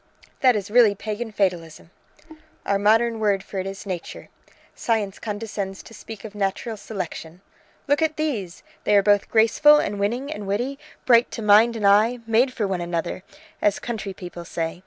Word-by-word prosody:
"That 255 Hz, -3 st, +4 dB
is 205 Hz, -1 st, -4 dB
really 225 Hz, -3 st, +5 dB
Pagan 220 Hz, +3 st, -5 dB
fatalism!" 175 Hz, -5 st, -2 dB, 0.7 s
"Our 200 Hz, 0 st, +1 dB
modern 225 Hz, +2 st, +3 dB
word 200 Hz, -3 st, +1 dB
for 195 Hz, -, -6 dB
it 190 Hz, -, -3 dB
is 195 Hz, +1 st, -7 dB
Nature. 185 Hz, -4 st, -6 dB, 0.4 s
Science 210 Hz, -4 st, -2 dB
condescends 205 Hz, -3 st, -5 dB
to -, -, -14 dB
speak 225 Hz, 0 st, -10 dB
of 210 Hz, -, -8 dB
natural 205 Hz, +3 st, -2 dB
selection. 180 Hz, -4 st, -7 dB, 0.5 s
Look 285 Hz, +2 st, +2 dB
at 315 Hz, -1 st, 0 dB
these! 225 Hz, -, -3 dB, 0.2 s
They 210 Hz, -, +2 dB
are 200 Hz, -, +4 dB
both 205 Hz, 0 st, +3 dB
graceful 230 Hz, +7 st, +5 dB
and 205 Hz, -8 st, -2 dB
winning 240 Hz, +8 st, -2 dB
and 210 Hz, -1 st, -7 dB
witty, 245 Hz, +8 st, -2 dB, 0.3 s
bright 235 Hz, -1 st, +5 dB
to 225 Hz, -, -6 dB
mind 215 Hz, +3 st, +5 dB
and 215 Hz, -2 st, -2 dB
eye, 215 Hz, +5 st, +4 dB
made 230 Hz, +4 st, +2 dB
for 225 Hz, -4 st, -2 dB
one 185 Hz, -2 st, -2 dB
another, 170 Hz, +1 st, -3 dB, 0.4 s
as 205 Hz, -1 st, +2 dB
country 220 Hz, -4 st, -5 dB
people 175 Hz, -2 st, -8 dB
say. 165 Hz, 0 st, -4 dB
210 Hz, 175 wpm, -23 LUFS, 195-230 Hz, 0.7 s, really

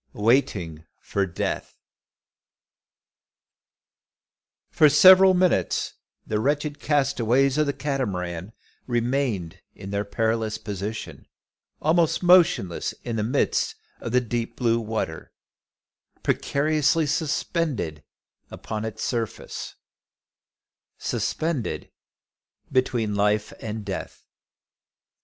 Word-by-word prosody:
WAITING 105 Hz, -, +1 dB, 0.2 s
FOR 100 Hz, -1 st, -1 dB
DEATH. 85 Hz, -, -4 dB, 2.9 s
For 155 Hz, -, +6 dB
several 185 Hz, +5 st, +8 dB
minutes 180 Hz, 0 st, +1 dB, 0.3 s
the 105 Hz, -, -1 dB
wretched 145 Hz, +4 st, -1 dB
castaways 135 Hz, -1 st, +2 dB
of 155 Hz, -, +2 dB
the 140 Hz, -, 0 dB
Catamaran 100 Hz, -, -3 dB, 0.4 s
remained 120 Hz, -, -1 dB
in 95 Hz, -, -8 dB
their 100 Hz, 0 st, 0 dB
perilous 110 Hz, +1 st, -1 dB
position, 105 Hz, 0 st, -6 dB, 0.6 s
almost 165 Hz, +2 st, +2 dB
motionless 175 Hz, -, +4 dB
in 120 Hz, -, -3 dB
the 110 Hz, -, 0 dB
midst 125 Hz, +6 st, 0 dB, 0.2 s
of 115 Hz, -, -5 dB
the 125 Hz, +1 st, +3 dB
deep 120 Hz, -1 st, -3 dB
blue 115 Hz, -2 st, +1 dB
water, 110 Hz, -1 st, -4 dB, 0.9 s
precariously 155 Hz, +2 st, +1 dB
suspended 145 Hz, -, -1 dB, 0.5 s
upon 110 Hz, 0 st, -5 dB
its 110 Hz, -, -5 dB
surface, 115 Hz, -4 st, -4 dB, 1.2 s
suspended 155 Hz, -7 st, -2 dB, 0.8 s
between 120 Hz, -5 st, +1 dB
life 105 Hz, +1 st, +1 dB
and 110 Hz, -1 st, -5 dB
death! -, -, -6 dB
120 Hz, 90 wpm, -25 LUFS, 105-145 Hz, 2.9 s, several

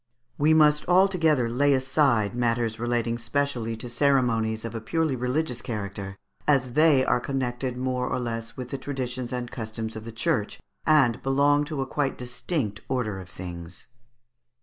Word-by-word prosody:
We 155 Hz, +2 st, +5 dB
must 150 Hz, -1 st, +4 dB
altogether 175 Hz, -8 st, +4 dB
lay 140 Hz, +4 st, +3 dB
aside 130 Hz, -5 st, +2 dB
matters 115 Hz, -2 st, 0 dB
relating 120 Hz, 0 st, -1 dB
specially 115 Hz, -2 st, -1 dB
to 115 Hz, -, -7 dB
ceremonies 120 Hz, -4 st, +1 dB
of 115 Hz, -, -5 dB
a 115 Hz, -, -4 dB
purely 160 Hz, +3 st, 0 dB
religions 125 Hz, +1 st, -1 dB
character, 100 Hz, -3 st, -5 dB, 0.3 s
as 130 Hz, -4 st, +2 dB
they 150 Hz, -3 st, +5 dB
are -, -, +2 dB
connected 125 Hz, -1 st, -2 dB
more 125 Hz, 0 st, -1 dB
or -, -, -1 dB
less 115 Hz, -1 st, -4 dB
with 125 Hz, -1 st, -6 dB
the 135 Hz, -, -4 dB
traditions 130 Hz, -3 st, -4 dB
and 125 Hz, -1 st, -4 dB
customs 110 Hz, -1 st, -5 dB
of 110 Hz, -, -6 dB
the 115 Hz, -, -7 dB
Church, 115 Hz, -2 st, -1 dB, 0.3 s
and 135 Hz, -7 st, +4 dB
belong 145 Hz, +2 st, +3 dB
to 145 Hz, -3 st, -3 dB
quite 140 Hz, 0 st, -1 dB
a -, -, -9 dB
distinct 120 Hz, -, -3 dB
order 120 Hz, -7 st, -1 dB
of 90 Hz, -1 st, -10 dB
things. 85 Hz, 0 st, -8 dB
125 Hz, 160 wpm, -26 LUFS, 115-140 Hz, 0.3 s, We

